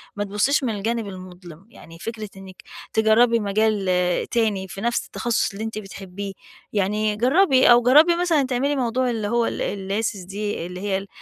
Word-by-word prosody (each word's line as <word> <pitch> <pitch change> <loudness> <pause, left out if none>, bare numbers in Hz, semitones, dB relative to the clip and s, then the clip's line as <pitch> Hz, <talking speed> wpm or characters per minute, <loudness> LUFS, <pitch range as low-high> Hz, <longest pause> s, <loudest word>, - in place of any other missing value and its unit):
ما 205 - -2
تبصيش 210 +9 +1
من 230 -4 -1
الجانب 225 +2 -2
المُظلم. 185 -2 -11
يعني 165 -7 -14
فكرة 220 0 -6
إنِّك 190 -1 -12 0.3
تجربي 230 +2 +4
مجال 210 0 0 0.5
تاني 215 -5 0
في 195 +2 -8
نفس 235 +1 0
التخصص 235 -2 -1
اللي 200 +2 -6
أنتِ 220 -1 -5
بتحبيه، 195 -1 -7 0.4
يعني 210 +1 0
جربي، 260 - +4
أو 240 0 +7
جربي 305 +8 +6
مثلًا 340 -5 +2
تعملي 265 +3 0
موضوع 255 -1 0
اللي 220 -3 -2
هو 235 +1 +1
ال - - -3 0.4
الLaces 195 -5 -4
دي 205 -3 -4
اللي 180 +1 -7
هي 200 -2 0
ال 195 +1 -7
215 Hz, 170 wpm, -22 LUFS, 195-240 Hz, 0.5 s, أو